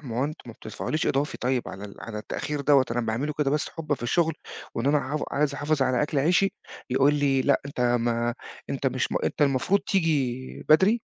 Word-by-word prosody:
ماهو 125 -1 -2
أنتم 155 +2 -5
ما 115 - -8
بتدفعوليش 130 +8 -3
إضافي 140 +2 0
طيب 125 -1 -1
على 100 +2 -8
ال 100 - -9
على 110 -2 -6
التأخير 145 +6 -4
دوَّة، 140 -1 +5
أنا 120 +1 0
باعملُه 120 +6 -2
كده 145 -2 +2
بس 150 +1 0
حبًا 155 -3 -2
في 130 - -12
الشغل، 160 +6 +1 0.4
وإن 115 - -2
أنا 145 +1 +4
ع 150 +1 -3
عايز 145 -1 0
أحافظ 145 0 0
على 130 0 +2
أكل 145 -1 0
عيشي، 180 +7 +3 0.4
يقول 135 +3 +4
لي 140 -2 +2
لأ 140 +1 +3
أنت 140 -3 -6
ما 120 -1 +1 0.4
أنت - - -2
مش - - 0 0.2
أنت - - 0
المفروض 140 +8 +2
تيجي 145 -10 -1
بدري، 195 +9 +5
140 Hz, 200 wpm, -26 LUFS, 120-150 Hz, 0.4 s, دوَّة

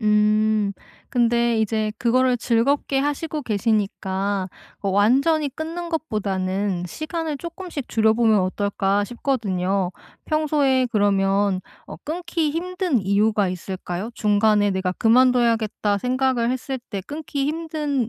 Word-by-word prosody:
음. 210 -1 +2 0.4
근데 235 -2 +2
이제 215 0 0
그거를 250 +1 +2
즐겁게 270 +4 +1
하시고 295 +2 -2
계시니까 200 -3 -1 0.3
어 200 - -2
완전히 270 - +3
끊는 335 +4 -5
것보다는 195 - -2
시간을 310 - -4
쪼끔씩 340 -5 -7
줄여보면 220 -1 +3
어떨까 200 +1 0
싶거든요. 200 -7 -1 0.3
평소에 290 -4 +2
그러면 200 -2 +2 0.3
어 - - -9
끊기 335 -1 -2
힘든 355 -3 -1
이유가 205 0 +2
있을까요? 185 +3 -5
중간에 210 -1 +3
'내가 190 -1 -1
그만둬야겠다.' 230 -3 +2
생각을 250 0 +1
했을 260 +1 -3
때 200 -3 -3
끊기 290 -2 -3
힘든 300 -6 -2
230 Hz, 280 characters per minute, -22 LUFS, 205-280 Hz, 0.4 s, 완전히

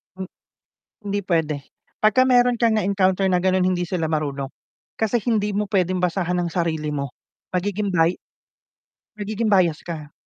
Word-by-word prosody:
M 190 - -5 0.8
hindi 205 0 -1
pwede 160 -4 +1 0.5
pagka 215 +4 +5
meron 245 -1 +4
kang 230 -2 +3
na-encounter 195 -2 +2
na 180 - +3
ganon 185 0 +2
hindi 180 -2 0
sila 165 -3 -1
marunong. 140 -3 -2 0.5
Kasi 220 +2 +2
hindi 210 -4 0
mo 210 - +1
pwedeng 185 -2 +1
basahan 180 0 0
ang 175 -1 -2
sarili 160 -3 -1
mo, 140 -2 -3 0.4
magiging 200 +3 -1
bay 170 -1 +3 1.1
magiging 215 +1 -1
bias 175 -5 +3
ka. 155 -4 -6
185 Hz, 145 wpm, -22 LUFS, 165-205 Hz, 1.1 s, pagka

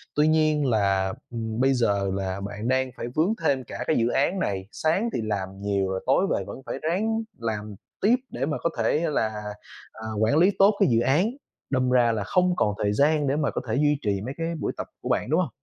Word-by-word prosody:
Tuy 150 +1 +4
nhiên 155 -2 +3
là, 100 -5 +1 0.2
ừm, 110 -1 -4
bây 135 +1 +4
giờ 100 -5 +1
là 95 0 -3
bạn 105 +3 -5
đang 130 0 +1
phải 120 - -4
vướng 170 +8 +2
thêm 135 -4 +2
cả - - -6
cái 155 - +2
dự 115 0 +2
án 175 +10 +1
này, 95 - -2
sáng 190 +9 0
thì - - -1
làm 100 -2 -3
nhiều 100 -2 0
rồi 95 0 -3
tối 140 +9 +3
về - - 0
vẫn 135 - -8
phải - - -4
ráng 215 +8 0 0.2
làm 105 -2 -4 0.3
tiếp 220 +5 +5
để 130 +3 -2
mà 155 - -1
có 170 - +1
thể 115 +6 +2
là, 110 -6 +1 0.6
à, 110 0 -9
quản 115 +7 +3
lý 185 +5 +5
tốt 200 +1 +6
cái 195 - +4
dự 115 -1 +3
án, 145 - +3 0.4
đâm 130 -2 +1
ra 120 -2 +4
là 105 -3 -1
không 180 - +2
còn 105 - +1
thời 105 0 +1
gian 145 +3 +3
để 135 - +1
mà 150 -2 0
có - - -3
thể 110 - 0
duy 145 +1 +3
trì 100 -3 -1
mấy 135 - -4
cái 165 0 -2
buổi - - -1
tập - - -4
của - - -5
bạn, - - 0
đúng 160 +4 +3
hông? 180 - 0
130 Hz, 240 wpm, -25 LUFS, 105-155 Hz, 0.6 s, tốt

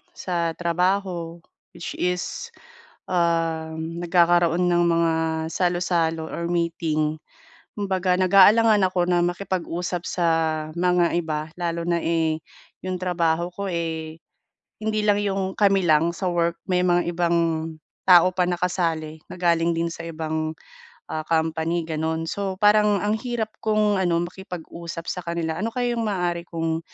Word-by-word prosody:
sa 170 -2 -1
trabaho, 175 -1 -1 0.4
which - - -6
is, 180 - -2 0.6
um, 165 -1 -1
nagkakaroon 175 0 +3
ng 175 0 +3
mga 165 -1 +2 0.4
salu-salo 175 -3 0
or 170 - -3
meeting. 160 -3 0 0.6
Kumbaga, 190 -3 0
nag-aalangan 205 +4 +6
ako 185 - -3
na 175 -1 +3
makipag-usap 175 -1 -3
sa 175 - -1 0.5
mga 180 0 +2
iba, 155 -2 -2
lalo 170 -1 -2
na, 170 -1 +2
eh, 160 -1 +1 0.5
yung 185 0 -2
trabaho 170 -2 0
ko, 200 +2 -5
eh, 160 -2 -3 0.6
hindi 215 0 -1
lang 205 -1 +4
yung 195 -1 -1
kami 195 -2 +4
lang 160 +1 +4
sa 185 - -3
work. 170 -1 +1
May 180 0 +3
mga 175 0 +3
ibang 170 0 +1 0.7
tao 180 -1 +7
pa 180 - +2
na 175 - 0
kasali 165 -3 -1
na - - -7
galing 170 -1 +3
din 165 +1 0
sa 165 - -8
ibang, 160 -1 -3 0.6
ah, 155 - -2
company, 160 +1 0
gano'n. 160 0 -2
So, 195 -1 -2
parang 210 0 +5
ang 205 +1 +1
hirap 235 -3 -3
kong 215 -2 +2
ano, 170 -2 +1
makipag-usap 170 -2 -8
sa 180 - -2
kanila. 165 -1 -2
Ano 220 - 0
kaya 245 -1 0
yung 230 - -1
maaari 175 -3 -1
kong 165 -1 -2
175 Hz, 140 wpm, -24 LUFS, 165-185 Hz, 0.7 s, tao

